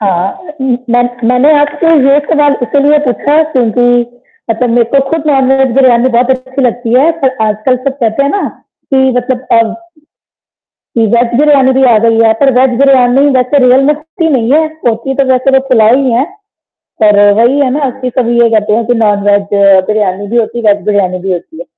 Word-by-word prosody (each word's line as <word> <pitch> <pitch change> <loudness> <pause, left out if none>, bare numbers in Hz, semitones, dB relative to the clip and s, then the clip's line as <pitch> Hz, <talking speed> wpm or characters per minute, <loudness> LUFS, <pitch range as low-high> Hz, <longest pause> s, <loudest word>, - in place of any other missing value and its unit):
हाँ, 195 - -3
म 260 -2 -1
मै 245 +1 +2 0.3
मैंने 250 +5 +3
आपसे 290 +3 -1 0.2
ये 280 +1 +4
सवाल 295 -2 +1
इसीलिए 285 +3 +1
पूछा 285 +6 +1
क्योंकि 245 -2 0 0.6
मतलब 235 +2 -1
मेरे 235 0 +2
को 275 - +3
खुद 320 -1 -3
नॉन 270 -3 +1
वेज 270 -1 +1
बिरयानी 255 -2 +3
बहुत 245 +1 0
अच्छी 260 +1 -3
लगती 240 -1 -2
है, 300 +5 +3
पर 260 -1 -1
आजकल 215 +4 -1
सब 270 - -2
कहते 225 +3 0
हैं 280 - -1
ना 405 - -2 0.5
कि 265 - +3 0.2
मतलब 250 +1 -3
अब 230 -1 +1 1.2
कि 225 - +2
वेज 235 0 0
बिरयानी 275 -3 +3
भी - - +2
आ - - +4
गई 225 0 +2
है 225 -1 +3
पर 275 -1 +3
वेज 255 -2 0
बिरयानी 270 0 +3
वैसे 255 +3 0
रियल 255 +2 +3
में 300 - +3
होती 320 +2 -5
नहीं 235 +1 -1
है 315 +2 +2
तो 315 -5 -5
होती 235 +4 -4
तो 275 - 0
वैसे 255 +2 0
वो - - -4
पुलाव 225 -2 +3
ही 265 -3 -1
है। 245 +4 +1 0.8
पर 210 -1 +4 0.2
वही 245 +5 +2
है 270 -3 +1
ना 275 0 -2
कि 255 -1 -3
कभी 240 -1 0
ये 235 - +4
कहते 210 -1 0
हैं 230 - -2
कि 245 - 0
नॉन 205 -2 0
वेज 205 0 +2 0.5
बिरयानी 205 -2 -2
भी 235 - -3
होती 230 +1 -3
है, - - -9
वेज 200 -2 -6
बिरयानी 195 -3 -1
भी 190 +1 -4
होती 180 - -7
है। - - -8
250 Hz, 205 wpm, -9 LUFS, 230-275 Hz, 1.2 s, ये